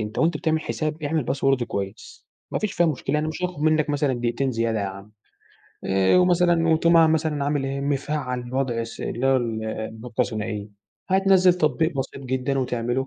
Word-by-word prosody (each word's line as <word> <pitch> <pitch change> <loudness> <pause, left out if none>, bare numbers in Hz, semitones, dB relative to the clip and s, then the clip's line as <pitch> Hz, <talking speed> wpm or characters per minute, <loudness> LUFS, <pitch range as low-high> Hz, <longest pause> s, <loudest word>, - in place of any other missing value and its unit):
أنت 105 - -8
وأنت 165 +2 +2
بتعمل 160 -2 0
حساب، 155 0 -3
اعمل 155 0 0
باسورد 135 0 +1
كويس، 100 -2 -6 0.2
ما - - -1
فيش 215 -2 -2
فيها 175 0 +2
مشكلة 145 -2 -2
يعنى 150 +1 +1
مش 155 +3 -6
هياخد 180 -4 -3
منك 155 -1 +2
مثلًا 145 -2 +1
دقيقتين 120 +2 -1
زيادة 115 -1 0
يا 100 - -1
عم. 100 +2 -9 0.7
آآ 95 - +3
ومثلًا 175 -2 +3
وتقوم 165 +1 +4
عامل 160 -1 +6
مثلًا 155 -3 0
عامل 145 -1 0
إيه 135 0 -3
مفعّل 135 -3 -2
وضع 130 -3 0
الس 115 0 -7
اللى 125 +3 -2
هو 135 0 +4
النقطة 110 0 -4
الثنائية، 105 -2 -2 0.4
هتنزِّل 190 -1 +4
تطبيق 160 -1 +1
بسيط 135 +1 -4
جدًا 130 +1 -1
وتعمله 125 0 -1
135 Hz, 180 wpm, -24 LUFS, 120-160 Hz, 0.7 s, عامل